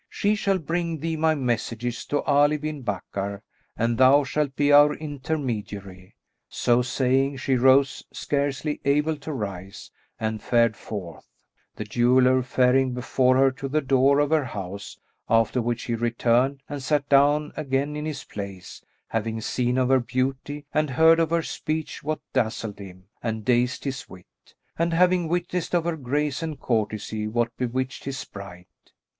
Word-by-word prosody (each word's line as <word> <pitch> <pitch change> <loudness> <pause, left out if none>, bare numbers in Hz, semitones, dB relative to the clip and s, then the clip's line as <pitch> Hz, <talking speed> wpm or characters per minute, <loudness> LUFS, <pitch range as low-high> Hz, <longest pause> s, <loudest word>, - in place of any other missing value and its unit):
She 205 +1 +1
shall 200 -2 +1
bring 170 0 -2
thee 160 +2 -2
my 160 0 +2
messages 120 -2 -2
to 145 - 0
Ali 145 +1 +3
bin 150 -1 -5
Bakkar 100 -2 -4 0.3
and 115 +1 0
thou 135 +3 +6
shalt 140 0 -2
be 145 +1 +2
our 145 +1 +7
intermediary." 120 -11 -5 0.3
So 120 0 +2
saying, 130 +2 +1
she 130 +1 0
rose, 130 +2 +4
scarcely 145 +1 -2
able 150 +3 +2
to 145 +2 -7
rise, 100 -7 -6 0.3
and 110 -1 -2
fared 115 -2 +2
forth, 95 -6 -8 0.5
the - - -4
jeweller 125 +4 +3
faring 125 0 +2
before 130 +1 +2
her 135 0 +5
to 135 +1 -6
the 150 +3 +1
door 135 0 +3
of 145 0 +1
her 160 -2 +3
house, 100 -3 -7 0.3
after 115 +2 +3
which 120 0 -2
he 120 - -3
returned 120 +4 +1
and 145 -1 -5
sat 145 +1 0
down 145 +2 +3
again 140 0 -1
in 150 0 -4
his 150 -3 -5
place, 100 -3 -8 0.3
having 115 0 -2
seen 125 +2 -1
of 130 -1 +2
her 135 0 +5
beauty 130 +4 -3
and 155 -1 +1
heard 160 +5 +5
of 165 -2 +2
her 165 0 +1
speech 155 0 -4
what 155 +1 -2
dazzled 110 -4 -1
him 95 -2 -11 0.2
and 110 -2 -3
dazed 125 0 +1
his 135 -2 -5
wit, 90 -1 -17 0.2
and 170 0 +1
having 180 -1 +3
witnessed 175 +1 -1
of 170 - +2
her 170 0 -1
grace 145 +1 -2
and 160 -3 -4
courtesy 110 -1 -2
what 115 +1 -1
bewitched 130 +2 -3
his 135 -1 -4
sprite. 100 -7 -9
130 Hz, 160 wpm, -25 LUFS, 115-150 Hz, 0.5 s, our